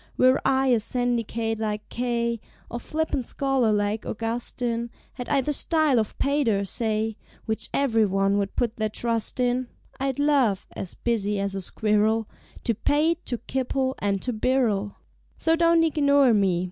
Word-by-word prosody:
Were 255 Hz, +1 st, +4 dB
I 265 Hz, 0 st, +2 dB
a 240 Hz, -3 st, +4 dB
syndicate 230 Hz, -1 st, -1 dB
like 210 Hz, -1 st, -3 dB
K. 235 Hz, -1 st, -1 dB, 0.3 s
Or 235 Hz, -, -3 dB
flippant 305 Hz, -2 st, -2 dB
scholar 270 Hz, -5 st, +1 dB
like 210 Hz, +1 st, 0 dB
Augustine; 235 Hz, +1 st, -3 dB, 0.2 s
Had 245 Hz, -2 st, -7 dB
I 280 Hz, -2 st, +3 dB
the 295 Hz, +3 st, -1 dB
style 310 Hz, -4 st, +3 dB
of 215 Hz, -, -3 dB
Pater, 265 Hz, -8 st, +1 dB
say, 220 Hz, +1 st, -1 dB, 0.3 s
Which 220 Hz, -1 st, -3 dB
ev'ryone 205 Hz, -6 st, +2 dB
would 200 Hz, -1 st, -3 dB
put 235 Hz, -2 st, -1 dB
their 215 Hz, -1 st, 0 dB
trust 230 Hz, +2 st, -2 dB
in, 250 Hz, 0 st, +1 dB, 0.3 s
I'd 270 Hz, -1 st, -1 dB
love 280 Hz, -9 st, +2 dB
(as 185 Hz, -, -6 dB
busy 210 Hz, -4 st, -1 dB
as 200 Hz, 0 st, -1 dB
a 195 Hz, -, -3 dB
squirrel) 215 Hz, +3 st, +1 dB, 0.4 s
To 230 Hz, -, +1 dB
pate, 315 Hz, -, +1 dB
to 240 Hz, -, -1 dB
kipple, 260 Hz, +2 st, -1 dB
and 200 Hz, -1 st, -1 dB
to 250 Hz, -, -2 dB
birrel. 220 Hz, -4 st, 0 dB, 0.4 s
So 325 Hz, 0 st, +2 dB
don't 335 Hz, 0 st, +4 dB
ignore 285 Hz, -5 st, +4 dB
me. 195 Hz, -4 st, +2 dB
235 Hz, 155 wpm, -25 LUFS, 215-265 Hz, 0.4 s, Were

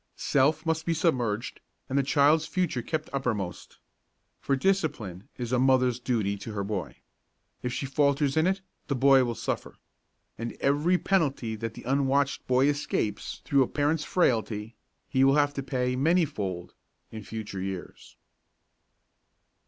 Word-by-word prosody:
Self 150 Hz, +4 st, +2 dB
must 160 Hz, 0 st, 0 dB
be 165 Hz, -, +2 dB
submerged 120 Hz, -, 0 dB, 0.3 s
and 135 Hz, -, -4 dB
the 140 Hz, -, +4 dB
child's 145 Hz, +3 st, +3 dB
future 175 Hz, -9 st, -1 dB
kept 155 Hz, +6 st, -3 dB
uppermost. 110 Hz, -10 st, -3 dB, 0.6 s
For 135 Hz, -, 0 dB
discipline 135 Hz, -, -1 dB
is 120 Hz, -1 st, -4 dB
a 125 Hz, -, +2 dB
mother's 130 Hz, -2 st, +3 dB
duty 110 Hz, -5 st, -1 dB
to 105 Hz, +2 st, -7 dB
her 100 Hz, -1 st, -2 dB
boy. 100 Hz, -2 st, -4 dB, 0.7 s
If 125 Hz, -, -2 dB
she 135 Hz, -, -3 dB
falters 140 Hz, 0 st, +1 dB
in 160 Hz, +2 st, +3 dB
it 190 Hz, +1 st, 0 dB, 0.3 s
the 140 Hz, -, 0 dB
boy 135 Hz, 0 st, +5 dB
will 120 Hz, -2 st, -2 dB
suffer. -, -, -4 dB, 0.6 s
And 115 Hz, 0 st, -4 dB
every 150 Hz, +6 st, +2 dB
penalty 140 Hz, -13 st, 0 dB
that 115 Hz, +1 st, -5 dB
the -, -, -9 dB
unwatched 140 Hz, +1 st, +1 dB
boy 130 Hz, +1 st, +4 dB
escapes 145 Hz, -8 st, -2 dB
through 140 Hz, -1 st, +3 dB
a 130 Hz, -, +3 dB
parent's 150 Hz, +2 st, 0 dB
frailty, 115 Hz, -, 0 dB, 0.3 s
he 130 Hz, -, +2 dB
will 135 Hz, +1 st, +5 dB
have 145 Hz, -1 st, +3 dB
to 140 Hz, -, -3 dB
pay, 125 Hz, -2 st, -1 dB
many 165 Hz, +6 st, +3 dB
fold, 95 Hz, -, -5 dB, 0.4 s
in 110 Hz, -, -6 dB
the 105 Hz, -, -11 dB
future 110 Hz, -4 st, -5 dB
years. 95 Hz, -1 st, -7 dB
135 Hz, 155 wpm, -27 LUFS, 115-145 Hz, 0.7 s, boy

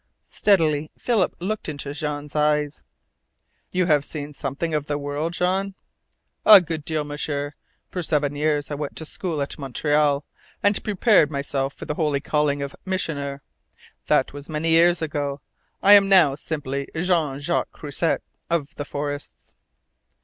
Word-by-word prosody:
Steadily 155 Hz, -7 st, +2 dB
Philip 225 Hz, -7 st, +1 dB
looked 200 Hz, +1 st, -3 dB
into 145 Hz, -1 st, -5 dB
Jean's 150 Hz, -1 st, -4 dB
eyes. 150 Hz, 0 st, +1 dB, 0.9 s
"You 180 Hz, 0 st, +1 dB
have 150 Hz, -4 st, +3 dB
seen 145 Hz, 0 st, -7 dB
something 145 Hz, +4 st, -3 dB
of 150 Hz, -1 st, -1 dB
the 145 Hz, -, -1 dB
world, 145 Hz, +3 st, -3 dB
Jean?" 190 Hz, +3 st, 0 dB, 0.7 s
"A 210 Hz, -2 st, +10 dB
good 160 Hz, -3 st, -4 dB
deal, 155 Hz, 0 st, -1 dB
M'sieur. 145 Hz, 0 st, -3 dB, 0.3 s
For 180 Hz, -, -4 dB
seven 145 Hz, -3 st, 0 dB
years 150 Hz, 0 st, 0 dB
I -, -, -1 dB
went 145 Hz, 0 st, -4 dB
to 160 Hz, -, -3 dB
school 160 Hz, -2 st, -3 dB
at 140 Hz, -, -7 dB
Montreal, 145 Hz, +1 st, +1 dB, 0.4 s
and 205 Hz, 0 st, +2 dB
prepared 205 Hz, -6 st, +4 dB
myself 140 Hz, -1 st, -2 dB
for -, -, -8 dB
the -, -, -2 dB
holy 150 Hz, -2 st, 0 dB
calling 145 Hz, -1 st, 0 dB
of 140 Hz, -, -6 dB
Missioner. 140 Hz, -7 st, -3 dB, 0.6 s
That -, -, +2 dB
was 145 Hz, +1 st, -8 dB
many 155 Hz, +1 st, -1 dB
years 170 Hz, +1 st, +4 dB
ago. 145 Hz, -2 st, -2 dB, 0.4 s
I 200 Hz, -, +8 dB
am 200 Hz, -1 st, +7 dB
now 175 Hz, -8 st, +6 dB
simply 140 Hz, -2 st, -4 dB
Jean 160 Hz, -5 st, +1 dB
Jacques 170 Hz, +4 st, -1 dB
Croisset, 150 Hz, +3 st, -1 dB, 0.3 s
of 165 Hz, -2 st, -1 dB
the 145 Hz, -, -4 dB
forests." 145 Hz, 0 st, -6 dB
150 Hz, 150 wpm, -23 LUFS, 145-170 Hz, 0.9 s, A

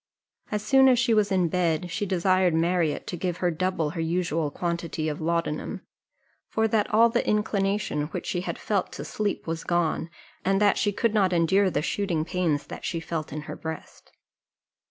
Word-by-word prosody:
As 210 Hz, -1 st, -1 dB
soon 265 Hz, +3 st, +6 dB
as 250 Hz, -, +5 dB
she 240 Hz, -1 st, +2 dB
was 210 Hz, -2 st, +2 dB
in 185 Hz, -2 st, +3 dB
bed, 170 Hz, 0 st, 0 dB
she 205 Hz, -, -2 dB
desired 185 Hz, -1 st, +2 dB
Marriott 165 Hz, -2 st, +1 dB
to -, -, -4 dB
give 175 Hz, 0 st, -2 dB
her 180 Hz, -1 st, +1 dB
double 165 Hz, -2 st, -1 dB
her 165 Hz, 0 st, -4 dB
usual 165 Hz, -2 st, 0 dB
quantity 170 Hz, -1 st, -3 dB
of 150 Hz, 0 st, -3 dB
laudanum; 165 Hz, -1 st, -2 dB, 0.7 s
for 220 Hz, 0 st, +1 dB
that 215 Hz, -1 st, +1 dB
all 230 Hz, +2 st, +6 dB
the 240 Hz, +1 st, +1 dB
inclination 200 Hz, -7 st, 0 dB
which -, -, -6 dB
she 175 Hz, -, -1 dB
had -, -, -4 dB
felt 200 Hz, -4 st, -1 dB
to -, -, -6 dB
sleep 210 Hz, -2 st, -2 dB
was 165 Hz, 0 st, -3 dB
gone, 170 Hz, -1 st, 0 dB, 0.3 s
and 195 Hz, +1 st, +2 dB
that 205 Hz, -1 st, +3 dB
she 205 Hz, -, +2 dB
could 225 Hz, +2 st, 0 dB
not 195 Hz, -4 st, +3 dB
endure 190 Hz, +4 st, +3 dB
the 150 Hz, -4 st, -1 dB
shooting 170 Hz, -3 st, -1 dB
pains 165 Hz, -4 st, 0 dB
that -, -, -9 dB
she 170 Hz, -, -2 dB
felt 165 Hz, -1 st, -4 dB
in 150 Hz, +2 st, -4 dB
her 150 Hz, 0 st, -7 dB
breast. 160 Hz, 0 st, -8 dB
180 Hz, 190 wpm, -26 LUFS, 165-200 Hz, 0.7 s, soon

